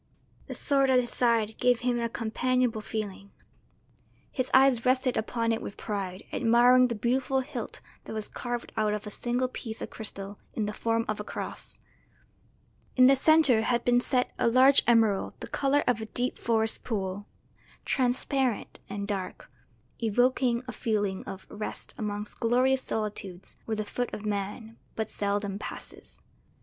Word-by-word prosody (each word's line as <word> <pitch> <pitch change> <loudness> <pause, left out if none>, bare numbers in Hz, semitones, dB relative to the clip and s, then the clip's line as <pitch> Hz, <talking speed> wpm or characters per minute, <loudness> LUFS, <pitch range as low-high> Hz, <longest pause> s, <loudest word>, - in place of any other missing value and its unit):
The - - -5
sword 275 -2 +2
at 255 -1 +5
his 240 -1 -2
side 230 -3 +1
gave 245 -1 +3
him 245 -1 +1
a 235 0 -1
companionable 240 0 0
feeling; 205 -2 -5 1.0
his 255 -2 -2
eyes 260 -3 +5
rested 255 0 +2
upon 230 +1 0
it 225 - -1
with 200 - -7
pride, 195 -3 -4
admiring 245 +2 +5
the 235 - -3
beautiful 260 +4 +1
hilt 255 -3 -6 0.2
that - - -7
was 215 -1 -3
carved 240 -1 -5
out 210 -1 +1
of 210 - -6
a 210 - -6
single 245 +4 0
piece 225 -3 -6
of - - -6
crystal 200 -2 -4 0.2
in 215 - 0
the 210 - -3
form 230 +1 0
of 215 -1 -2
a - - -3
cross. - - -6 1.2
In 255 - +7
the 270 +1 +7
centre 280 -4 +5
had 235 +1 0
been 245 0 +4
set 250 0 +1
a - - +3
large 260 +4 +6
emerald 225 -4 +3
the - - -6
colour 280 +1 +1
of 240 -3 +1
a 220 - -5
deep 245 +3 -2
forest 225 -1 +1
pool, 200 -2 -3 0.6
transparent 255 -2 0
and 200 0 -4
dark, 195 -3 -4 0.5
evoking 245 +2 +2
a - - -3
feeling 210 -4 -1
of 190 0 -8
rest 210 0 -5
amongst 210 -1 -4
glorious 255 +3 +3
solitudes 200 -5 -5
where 220 -1 -2
the 215 - -2
foot 245 +3 -3
of 215 - -8
man 210 +3 -4 0.2
but 220 -1 -3
seldom 200 -1 -2
passes. - - -9
230 Hz, 160 wpm, -28 LUFS, 210-250 Hz, 1.2 s, In